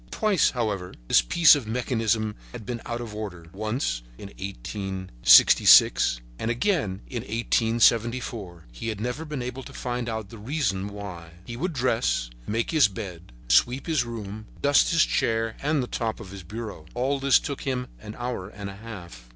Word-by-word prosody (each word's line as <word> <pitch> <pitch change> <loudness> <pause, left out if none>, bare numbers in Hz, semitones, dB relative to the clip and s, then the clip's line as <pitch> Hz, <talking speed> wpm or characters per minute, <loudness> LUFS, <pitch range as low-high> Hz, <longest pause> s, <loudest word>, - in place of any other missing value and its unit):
Twice, 210 -6 +2
however, 105 -7 -3
this - - +5
piece 155 - +6
of 140 -7 -1
mechanism 115 -2 0 0.2
had 115 -4 -8
been 120 0 -4
out 120 0 -3
of 115 -3 -7
order—once 100 - -4 0.2
in 100 - -9
1866 95 - +4 0.2
and 115 - -2
again 120 - 0
in 120 -3 -5
1874; 115 -4 +1
he - - -7
had 110 -3 -3
never 125 +8 -3
been 150 -5 -4
able 125 +2 -5
to - - -11
find 120 -1 -4
out 110 -3 -4
the 115 - -11
reason 105 -6 -1
why. 95 -5 -8
He 120 - -7
would 175 +8 -2
dress, 60 - 0 0.2
make 115 +2 -1
his 155 -7 +5
bed, 95 - -8 0.2
sweep 125 - +3
his 160 -5 +1
room, 110 -2 -7
dust 145 0 +4
his 165 -2 +4
chair 115 0 0
and 145 -1 +1
the - - -2
top 115 -2 -3
of 95 - -10
his 100 -1 -8
bureau. 105 -3 -8
All 135 +3 0
this 135 0 +5
took 140 -1 -4
him 130 -2 -2
an 105 0 -9
hour 120 -6 -4
and 100 -2 -7
a 95 - -12
half. 85 - -10
115 Hz, 170 wpm, -25 LUFS, 100-125 Hz, 0.2 s, piece